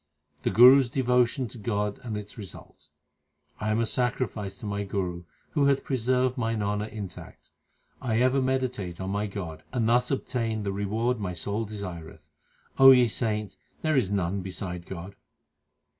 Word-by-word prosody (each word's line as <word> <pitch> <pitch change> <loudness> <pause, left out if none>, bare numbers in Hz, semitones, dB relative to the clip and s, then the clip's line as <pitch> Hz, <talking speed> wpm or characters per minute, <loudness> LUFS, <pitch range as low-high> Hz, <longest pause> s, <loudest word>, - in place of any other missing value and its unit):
The - - 0
Guru 125 +4 +9
s 130 -3 0
devotion 125 0 +1
to 115 - -11
God 105 -1 -2
and 115 -5 -4
its 105 0 -8
results: 90 -7 -11 0.7
1 105 - -2
am 110 +1 +1
a 115 - +2
sacrifice 115 -5 -1
to - - -8
my 100 0 -2
Guru 90 -3 -3 0.3
Who 145 -3 +2
hath 140 -1 +2
preserved 130 0 0
mine 115 -3 -1
honour 105 +1 -1
intact. 105 -4 -9 0.5
I 115 -3 0
ever 130 +2 +3
meditate 125 -9 -2
on 95 0 -3
my 105 +1 -1
God, 90 -6 -6
And 120 -3 0
thus 120 +2 +3
obtain 115 -5 -2
the 100 -1 -2
reward 110 +5 -1
my 95 -3 -3
soul 105 +5 -2
desireth. 85 -7 -8 0.5
O 135 0 +10
ye 125 -2 +7
saints, 105 -3 -2 0.3
there 155 -1 +2
is 120 -8 +2
none 95 -1 -1
beside 90 -2 -5
God. 95 +2 -8
110 Hz, 165 wpm, -27 LUFS, 100-125 Hz, 0.7 s, O